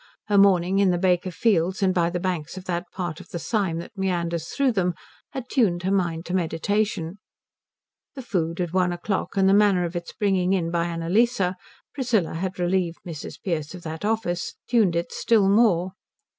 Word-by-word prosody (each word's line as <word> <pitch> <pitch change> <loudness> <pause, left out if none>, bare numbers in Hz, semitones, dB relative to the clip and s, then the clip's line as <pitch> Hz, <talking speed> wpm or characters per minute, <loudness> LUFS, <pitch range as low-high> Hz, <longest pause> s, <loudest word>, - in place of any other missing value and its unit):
Her 205 - +3
morning 190 -1 +4
in 200 -1 +4
the 175 - +2
Baker 180 0 +1
fields 185 0 +1
and 185 -1 +3
by 170 -2 +2
the 175 0 -2
banks 175 -2 -3
of 185 - -8
that 175 -1 -2
part 175 -4 -4
of - - -13
the - - -5
Sym 190 -2 -1
that 170 +7 -8
meanders 170 -4 -1
through 275 -2 +1
them 180 -5 0 0.3
had 260 -2 -6
tuned 190 -10 +1
her 190 - 0
mind 175 -4 0
to 180 - -5
meditation. 185 +1 -1 1.0
The 265 - -7
food 170 -7 -2
at 175 -2 -2
one 180 -1 +2
o'clock 190 +3 -3
and 190 0 +4
the 195 - +5
manner 200 -3 +4
of 170 +1 -5
its 175 0 -4
bringing 195 -3 +1
in 170 -3 0
by 170 -1 +1
Annalise 175 +9 +1 0.5
Priscilla 235 - 0
had 185 +3 -3
relieved 175 -1 0
Mrs. 165 -4 -7
Pearce 160 -3 -2
of 175 - -11
that 160 +2 -6
office 210 -5 -1
tuned 215 -8 +3
it 170 0 -1
still 215 -4 +3
more. 195 -4 +3
180 Hz, 190 wpm, -24 LUFS, 170-200 Hz, 1.0 s, the